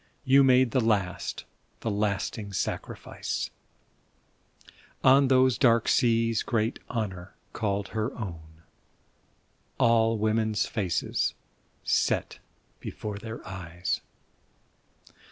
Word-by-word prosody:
You 135 +1 +6
made 130 -2 +5
the 130 - +2
last, 100 -5 -1 0.4
the 115 - -1
lasting 100 +1 -2
sacrifice! - - -3 1.5
On 135 +1 +6
those 130 -1 +4
dark 115 -4 +4
seas 115 -1 +3
great 115 -1 -1
Honor 95 -5 -4 0.2
called 100 -2 -2
her 110 +3 -2
own, 80 -6 -8 1.1
All 115 -1 +3
women's 110 0 +1
faces 95 -6 -1 0.5
set - - 0 0.4
before 105 -1 -6
their 110 +1 -8
eyes! 90 -1 -3
110 Hz, 90 wpm, -27 LUFS, 100-115 Hz, 1.5 s, You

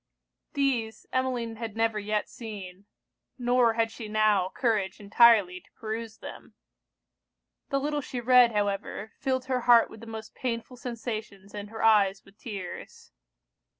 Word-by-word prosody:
These, 245 -6 -1
Emmeline 250 -3 -1
had 225 -2 -6
never 225 -1 +1
yet 210 0 -1
seen; 200 -4 -9 0.5
nor 245 -1 +3
had 225 0 +1
she 225 -1 -8
now 210 -3 +2
courage 210 -5 -1
entirely 205 -3 +5
to - - -28
peruse 220 0 -6
them. - - -11 1.1
The 275 - +1
little 295 +1 -1
she 255 -2 -5
read, 245 0 +6
however, 205 0 -2
filled 260 -2 -1
her 255 -1 0
heart 235 -1 +5
with 220 - -11
the 230 - -11
most 220 -1 -8
painful 240 0 -4
sensations 220 -5 -6
and 205 0 -6
her 225 +1 -6
eyes 200 -3 +4
with 195 +2 -21
tears. 195 -6 -8
225 Hz, 145 wpm, -28 LUFS, 210-245 Hz, 1.1 s, read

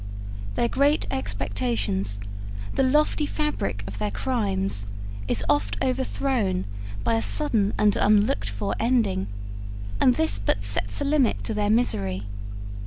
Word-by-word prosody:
Their 235 - +2
great 285 +5 +2
expectations, 100 -2 -1 0.5
the - - +1
lofty 300 +2 +2
fabric 300 - -2
of 100 +1 -7
their 105 -1 0
crimes, 195 - -1 0.4
is 100 -3 0
oft 100 +1 +1
overthrown 255 -7 0 0.4
by - - +2
a 115 - +2
sudden 150 - +3
and 210 -1 +4
unlooked 205 - +3
for 100 +1 -2
ending, 225 - +1 0.7
and 125 +2 +5
this 105 -2 +2
but 100 0 0
sets 100 - +3
a - - 0
limit 280 -4 +2
to 225 - -2
their 210 -1 0
misery. 100 - +1
180 Hz, 130 wpm, -25 LUFS, -, 0.7 s, and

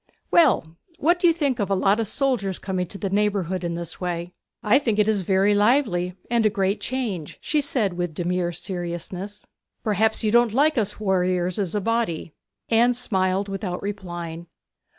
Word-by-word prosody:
Well, 210 - +4 0.2
what 345 +2 +2
do 350 - +4
you 335 - +5
think 285 -7 -1
of 200 -2 -1
a 195 - +2
lot 195 +3 +2
of 225 - 0
soldiers 220 -6 0
coming 185 -2 -3
to 195 - -8
the 195 -1 -3
neighbourhood 195 -3 0
in 170 -1 -2
this 170 0 -7
way?' 175 0 -3 0.3
'I 220 +6 +5
think 225 -7 -1
it 210 -1 +3
is 215 -3 +2
very 190 +3 +3
lively, 205 -5 +2
and 235 -1 +2
a 215 - +4
great 195 0 0
change,' 220 - -3
she 300 -1 0
said 240 -9 0
with 175 -3 -3
demure 175 0 -1
seriousness. 180 +3 -6 0.4
'Perhaps 220 +2 +2
you 215 - +2
don't 235 -1 +4
like 300 +3 +4
us 210 -1 -2
warriors 185 -2 0
as 195 -1 -2
a 205 - 0
body?' 220 -8 -1 0.3
Anne 235 +2 +4
smiled 190 -4 0
without 195 -2 -4
replying. 175 -4 -6
200 Hz, 180 wpm, -24 LUFS, 180-225 Hz, 0.4 s, you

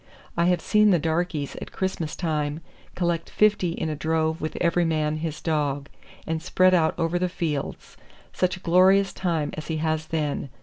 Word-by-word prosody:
I 170 - +2
have 180 0 +2
seen 210 0 +4
the 180 - +5
darkies 160 -2 -1
at - - -8
Christmas 180 -4 -3
time 150 -2 -2 0.3
collect 170 -2 -1
fifty 210 -5 +2
in 160 - -3
a 155 - -2
drove 160 +1 0
with 155 - -3
every 175 0 +2
man 155 -2 0
his 155 -1 -4
dog, 145 -3 -1 0.4
and 160 -1 -2
spread 185 +2 +3
out 160 -3 +3
over 170 +1 0
the 180 0 0
fields. 160 -6 -4 0.4
Such 185 -1 0
a - - -15
glorious 190 +3 +4
time 165 -5 -1
as 155 - -7
he 160 - -2
has 155 0 -1
then! 150 -3 -2
165 Hz, 180 wpm, -25 LUFS, 155-180 Hz, 0.4 s, the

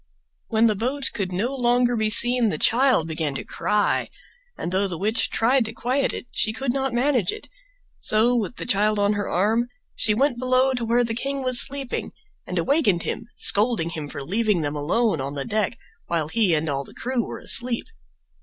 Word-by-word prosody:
When 225 0 +2
the 220 - +3
boat 260 +6 -2
could 190 -3 -3
no 215 +9 -2
longer 245 -1 +2
be 220 -1 0
seen 240 +1 +6
the 155 - -2
child 240 - +2
began 155 -3 -3
to - - -4
cry, 210 -1 0 0.5
and 175 - -4
though 195 +2 +1
the 175 -3 -5
witch 215 +6 0
tried 250 +3 +2
to 220 - -5
quiet 255 +4 -1
it - - -7
she 220 - 0
could 255 +1 -2
not 270 -1 -1
manage 245 -5 +1
it; - - -9 0.5
so, 225 +3 +2
with 230 0 -2
the - - -6
child 210 -1 +2
on 205 0 +2
her 205 -1 -3
arm, 220 +6 +1 0.3
she 210 - +1
went 260 0 +1
below 255 +1 +2
to 245 -2 -3
where 235 +2 +2
the 230 -1 -2
king 275 +3 -3
was 255 -2 +4
sleeping, 275 -2 -2 0.3
and 180 - -4
awakened 200 - +1
him, 230 - -4
scolding 205 -6 +4
him 155 -3 -6
for 145 -1 -6
leaving 205 +3 0
them 145 0 -3
alone 165 - 0
on 140 +2 -5
deck 215 +2 -1 0.3
while 160 -3 -2
he 205 -4 +2
and 155 +1 -1
all 140 -2 -2
the - - -15
crew 250 -1 -2
were - - -7
asleep. 240 -1 0
225 Hz, 200 wpm, -23 LUFS, 185-245 Hz, 0.5 s, seen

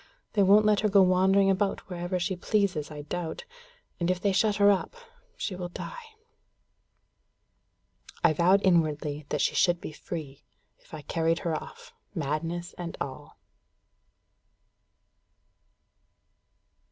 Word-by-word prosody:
They 205 - +2
won't 205 +2 +6
let 210 -1 +4
her 215 - +1
go 200 -1 +6
wandering 190 +2 +4
about 195 +1 -1
wherever 180 0 -3
she 185 +2 -1
pleases, 185 -5 0
I 150 -1 -8
doubt. 165 - -5 0.5
And 170 0 0
if 185 -1 +1
they 200 +1 +1
shut 205 +2 +2
her 205 0 +5
up, 200 - -1 0.4
she 190 - -3
will 180 -1 -5
die." 455 - -9 2.1
I 160 - +5
vowed 185 +5 +3
inwardly 150 -4 +1
that 150 - -1
she - - +1
should 175 -1 +3
be - - -7
free, 150 -3 -8 0.4
if - - -25
I 155 - -7
carried 165 +1 0
her 165 -2 0
off, - - -9 0.2
madness 165 +3 -3
and 170 -1 -5
all. 130 - -7
180 Hz, 130 wpm, -28 LUFS, 160-195 Hz, 2.1 s, won't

